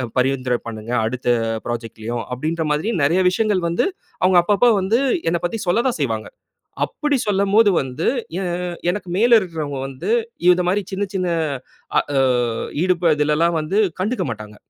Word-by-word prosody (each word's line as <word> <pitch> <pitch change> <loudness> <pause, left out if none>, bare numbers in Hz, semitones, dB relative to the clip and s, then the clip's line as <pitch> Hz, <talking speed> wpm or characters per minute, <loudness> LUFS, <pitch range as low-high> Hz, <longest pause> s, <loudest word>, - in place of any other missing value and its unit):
அ - - -1
பரிந்துரை 130 -1 +1
பண்ணுங்க. 110 +1 -6
அடுத்த 125 +2 -3 0.4
புராஜெக்ட்லயும் 115 0 -4
அப்பிடின்ற 160 +6 -2
மாதிரி, 150 +8 -1
நிறைய 165 +6 +3
விஷயங்கள் 205 0 +1
வந்து 170 - +1 0.4
அவுங்க 185 -1 +5
அப்போ 205 +4 +2
அப்போ 245 - +5
வந்து 215 +6 +1 0.3
என்னப் 170 0 -2
பத்தி 225 +5 -4
சொல்லதான் 235 +4 +1
செய்வாங்க. 115 -5 -1 0.6
அப்படி 295 -2 -1
சொல்லும்போது, 205 +2 +3
வந்து 130 +3 -4 0.3
எ - - -2 0.5
எனக்கு 185 -1 -4
மேலே 235 +2 +5
இருக்கிறவுங்க 155 -6 -4
வந்து 135 +9 -7 0.4
இந்தமாரி 180 +2 +4
சின்ன, 200 +2 -1
சின்ன 185 -2 0 0.7
அ - - +6 0.2
ஆ - - +4 0.6
ஈடுப 175 -3 +2
இதிலெல்லாம் 150 +3 +2
வந்து 180 +7 -2 0.2
கண்டுக்க 220 +7 -1
மாட்டாங்க. 105 -1 -8
170 Hz, 145 wpm, -20 LUFS, 130-195 Hz, 0.7 s, அ